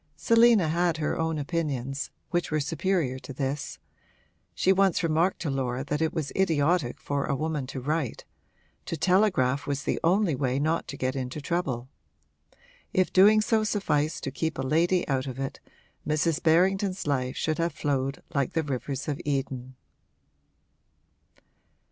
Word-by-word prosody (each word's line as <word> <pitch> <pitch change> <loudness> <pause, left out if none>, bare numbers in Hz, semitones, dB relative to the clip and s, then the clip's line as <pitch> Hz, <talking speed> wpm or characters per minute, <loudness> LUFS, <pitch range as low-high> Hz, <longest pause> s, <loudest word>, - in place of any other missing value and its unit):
Selina 230 -3 +5
had 170 0 +1
her 155 -1 -1
own 160 -1 -1
opinions, 140 -4 -2 0.2
which 175 0 0
were 155 - 0
superior 155 -2 -1
to 135 - -9
this 135 +1 -3 0.8
she 190 - +3
once 195 -2 +2
remarked 165 +3 +1
to 155 -5 -2
Laura 130 -1 -2
that 150 +2 -2
it 160 - +1
was 155 -4 -3
idiotic 160 -6 +1
for 140 -1 -2
a 140 - 0
woman 150 -2 -2
to 135 - -5
write 145 -1 -2 0.6
to 165 - -3
telegraph 160 -7 +2
was 140 0 -2
the - - -1
only 185 0 +3
way 130 -1 0
not 155 +3 0
to - - -6
get 130 +1 -1
into 130 +2 -4
trouble. 145 -7 -2 1.0
If 185 -1 +1
doing 210 +3 +7
so 220 0 +2
sufficed 170 -7 0
to 135 - -3
keep 160 +3 -2
a 135 - -2
lady 170 +6 +2
out 135 -1 0
of 130 -1 -5
it 135 0 -4 0.5
Mrs. 155 +1 +1
Berrington's 185 +4 +2
life 130 -3 -1
should 155 +1 -1
have 170 +1 +1
flowed 140 -2 -2
like 140 -3 0
the 160 - +1
rivers 135 -1 -4
of 145 -2 -2
Eden. 130 -3 -3
150 Hz, 155 wpm, -27 LUFS, 135-175 Hz, 1.0 s, doing